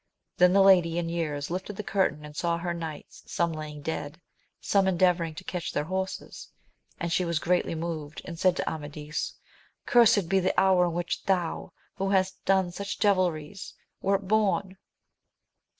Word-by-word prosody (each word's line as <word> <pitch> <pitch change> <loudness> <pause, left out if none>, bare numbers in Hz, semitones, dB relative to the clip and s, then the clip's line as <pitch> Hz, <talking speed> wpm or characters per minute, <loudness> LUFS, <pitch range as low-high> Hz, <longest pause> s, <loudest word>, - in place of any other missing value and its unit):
Then 180 0 +6
the 195 0 +6
lady 175 -4 +5
in 170 -1 -1
years 155 -3 -3
lifted 190 +3 -4
the 210 - -5
curtain 190 -7 0
and 150 0 -11
saw 170 +1 0
her 170 0 -3
knights, 160 -3 -7
some 170 -1 0
laying 150 -2 -7
dead, 160 0 -4 0.4
some 195 -1 +2
endeavouring 175 -3 +2
to 185 - -8
catch 180 -2 -4
their 145 - -1
horses, 190 +3 -5 0.5
and 170 0 -2
she 180 - +2
was 170 -2 0
greatly 175 0 0
moved, 160 -2 -5
and 170 -2 -7
said 185 -1 +3
to - - -2
Amadis, 150 0 -4 0.5
Cursed 220 -6 +5
be 195 +2 +3
the 185 0 +1
hour 190 -2 +4
in 170 - -3
which 175 0 -3
thou, 180 -4 -1 0.3
who 195 0 -1
hast 190 -1 +1
done 190 -2 +2
such 200 +3 -5
devilries, 185 -3 0 0.3
wert 195 0 0
bom! 200 -2 +1
175 Hz, 165 wpm, -27 LUFS, 165-190 Hz, 0.5 s, Then